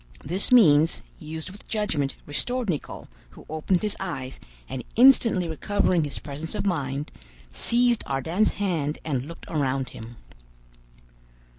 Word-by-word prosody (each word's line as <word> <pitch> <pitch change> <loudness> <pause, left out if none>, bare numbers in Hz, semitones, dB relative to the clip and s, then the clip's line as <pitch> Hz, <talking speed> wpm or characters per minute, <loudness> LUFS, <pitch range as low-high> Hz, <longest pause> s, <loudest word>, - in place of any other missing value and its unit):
This 185 - +2
means, 165 -10 +6 0.2
used 160 +2 -6
with 205 - -15
judgment, 160 -11 -1
restored 240 +8 -1
Nicholl, 150 - -6 0.2
who 65 - -15
opened 160 +4 0
his 210 - -1
eyes, 135 -9 -5 0.3
and 130 - -5
instantly 230 -7 +6
recovering 175 0 +1
his 145 - -5
presence 150 +5 -6
of - - -2
mind, 145 -6 -2 0.4
seized 235 - +2
Ardan's 165 +10 +1
hand 165 -7 -1
and 135 -4 -2
looked 165 - -10
around 135 -4 -1
him. 115 +2 -10
160 Hz, 130 wpm, -25 LUFS, 140-205 Hz, 0.4 s, means